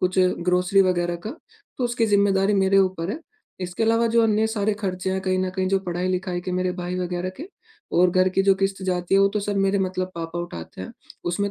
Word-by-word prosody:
कुछ 185 +1 0
ग्रोसरी 180 +1 +2
वग़ैरह 175 -2 0
का, - - -3 0.5
तो 255 - 0
उसकी 240 -1 +1
जिम्मेदारी 200 -1 +3
मेरे 195 0 +3
ऊपर 185 -2 +1
है। 265 - -4 0.4
इसके 180 +3 -3
अलावा 230 +1 +3
जो 230 - +5
अन्य 220 0 +2
सारे 215 -1 0
खर्चे 190 -3 -3
हैं, 190 - -1
कहीं 185 0 0
न 185 0 0
कहीं 190 0 -2
जो 195 0 +2
पढ़ाई-लिखाई 180 0 -2
के 185 0 -5
मेरे 180 0 0
भाई 180 0 -4
वग़ैरह 180 0 -2
के 320 +7 -8 0.5
और 180 +1 +5
घर 185 +1 +3
की 195 +1 +1
जो 195 0 +5
किश्त 195 0 -2
जाती 180 -1 -1
है 195 - +6
वो 195 - +5
तो 210 +1 -2
सर 205 0 -2
मेरे 195 0 +2
मतलब 185 -1 -2
पापा 165 0 -5
उठाते 85 - -7
हैं। 95 - -7 0.3
उसमें 200 +4 -1
185 Hz, 225 wpm, -23 LUFS, 180-200 Hz, 0.5 s, है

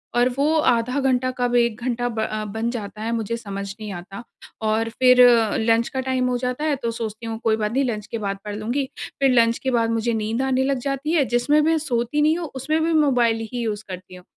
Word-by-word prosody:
और 245 +1 +4
वो 300 +3 +2
आधा 250 0 +2
घंटा 255 -1 +1
कब 245 0 0
1 235 -1 +2
घंटा 245 -1 -1
ब 220 -1 -3
अ, 215 0 -2
बन 220 +3 -3
जाता 215 -2 -6
है, 230 +1 -2
मुझे 230 0 -2
समझ 200 -3 -6
नहीं 215 -1 -6
आता 195 +5 -8 0.4
और 220 +1 0
फिर 250 +1 +4 0.4
लंच 225 +1 +2
का 265 - -4
टाइम 260 -1 0
हो 245 - 0
जाता 250 +3 -3
है, 305 -2 +1
तो 235 -4 -3
सोचती 225 0 -6
हूँ, 225 -1 -4
कोई 220 -1 +3
बात 210 0 -1
नहीं, 275 +3 +1
लंच 215 -4 -3
के 230 - -2
बाद 200 -2 -3
पढ़ 205 0 -4
लूँगी। 240 +6 -1 0.4
फिर 270 -1 +4
लंच 230 -1 +4
के 260 - -2
बाद 230 -1 +1
मुझे 230 +1 0
नींद 220 +2 -1
आने 265 0 +1
लग 275 0 0
जाती 275 +3 -2
है। 300 -5 +3
जिसमें 255 +5 +2
भी 315 - +2
मैं 325 - +3
सोती 260 0 -1
नहीं 310 +2 +3
हूँ, 340 - -4
उसमें 305 +5 0
में 325 +1 +1
मोबाइल 240 -7 +2
ही 245 - -2
यूज़ 215 -1 -3
करती 185 0 -8
हूँ। 180 - -14
235 Hz, 240 wpm, -22 LUFS, 220-265 Hz, 0.4 s, और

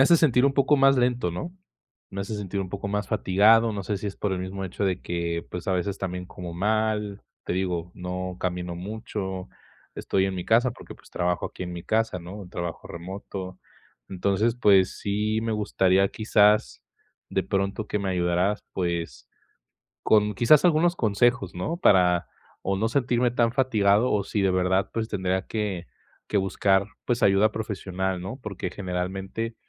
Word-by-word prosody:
hace 155 +6 +7
sentir 135 -5 +4
un 135 - +1
poco 140 +1 +4
más 135 0 +5
lento, 125 -6 +1
¿no? 90 - -5 0.6
Me 100 0 -4
hace 100 +3 -5
sentir 100 -1 -3
un 95 - -5
poco 100 +1 -4
más 105 -1 -2
fatigado, 110 +4 +4
no 100 -1 -4
sé 100 +2 -2
si 105 - -5
es 100 - -5
por 105 - -1
el 95 - -1
mismo 95 +1 -5
hecho 95 +2 -3
de 95 -1 -1
que, 85 -1 -2
pues, 90 -1 -6
a - - +2
veces 95 +2 -1
también 90 -1 -4
como 90 -2 -8
mal, 105 +1 0 0.2
te - - -2
digo, 90 -2 -2
no 90 0 -5
camino 90 -1 -2
mucho, 95 -1 -5 0.5
estoy 95 -1 0
en 95 - -1
mi 90 - -4
casa 120 +3 +4
porque, 120 - -11
pues, - - -20
trabajo 90 0 -1
aquí - - -6
en 90 - -6
mi 85 - -6
casa, 110 -2 0
¿no?, 95 +2 -9
trabajo 85 -2 -5
remoto. 95 +1 -7 0.5
Entonces, 100 +4 +1
pues, 100 -5 +4
sí 105 +2 -1
me 115 -1 -1
gustaría, 100 -2 +2
quizás, 105 - +2 0.5
de - - 0
pronto, 100 +2 -2
que 105 - -1
me 100 -1 -2
ayudaras, 90 +3 +1
pues, 85 -9 -3 0.7
con 105 -1 +3
quizás 120 - +5
algunos 175 +1 +3
consejos, 110 -1 +1
¿no? 120 - -3
Para 90 - +4 0.4
o 95 0 0
no 110 +3 +1
sentirme 120 -1 +1
tan 120 -1 +1
fatigado, 115 -3 +3
o 100 -2 +1
si 105 - -2
de 95 - +3
verdad, 95 +2 +1
pues, 115 0 -2
tendría 95 -1 -1
que 100 -6 -3 0.4
que 105 - +1
buscar, 95 0 +2 0.2
pues, 120 0 -1
ayuda 100 +1 +4
profesional, 95 -3 -3
¿no? 95 +7 -5
Porque, 100 -5 -5
generalmente 95 +4 -4
100 Hz, 175 wpm, -26 LUFS, 90-110 Hz, 0.7 s, hace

